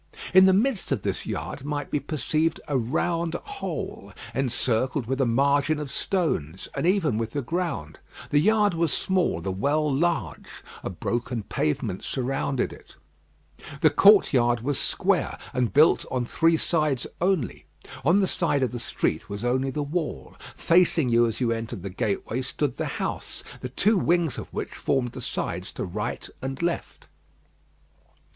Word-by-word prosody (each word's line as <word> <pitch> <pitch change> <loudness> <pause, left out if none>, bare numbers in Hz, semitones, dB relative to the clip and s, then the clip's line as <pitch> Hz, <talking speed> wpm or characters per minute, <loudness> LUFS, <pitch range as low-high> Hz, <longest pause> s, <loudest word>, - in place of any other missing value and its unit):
In 190 0 +8
the - - +6
midst 215 - +1
of 125 -8 0
this - - -2
yard - - -4
might 145 0 -3
be 150 - +1
perceived 155 +2 0
a 145 - -1
round 165 +7 0
hole, 410 - -5 0.2
encircled 130 0 0
with 135 +3 -1
a 130 - +3
margin 140 +5 +2
of 150 -3 -5
stones, 95 - -1
and - - -1
even 180 - +2
with 115 0 -3
the 145 - -2
ground. 160 - -3 0.3
The 145 - +5
yard 210 +1 +3
was 165 -2 +1
small, 185 - +1
the 95 - -2
well 145 +9 +1
large. 135 - -1 0.3
A - - -4
broken 120 -1 -3
pavement 90 +4 -2
surrounded 135 0 -1
it. - - -16 0.9
The - - +6
courtyard 125 - +5
was 140 +3 -1
square, - - 0 0.2
and 125 -3 +1
built 150 +3 +5
on 125 -2 -1
three 165 +6 +3
sides 155 -6 0 0.2
only. 180 -8 0 0.4
On 170 +8 +4
the 195 -2 +3
side 155 -7 +1
of 130 - 0
the 120 - -5
street 80 -6 -2
was 100 +3 -4
only 130 +2 +1
the 150 +2 -2
wall; 150 - -3 0.2
facing 165 -5 +3
you 120 0 +4
as 115 - -4
you 120 -3 +1
entered 115 -4 -4
the 100 - -5
gateway 110 +5 -2
stood 130 +2 -2
the - - -1
house, - - -4 0.2
the 125 - -5
two 205 - +2
wings 170 -3 +1
of - - -9
which - - -4
formed 125 -3 -1
the - - -8
sides 90 +3 -3
to - - -3
right 105 +4 -4
and 135 +4 -4
left. 170 0 -3
140 Hz, 165 wpm, -26 LUFS, 120-165 Hz, 0.9 s, In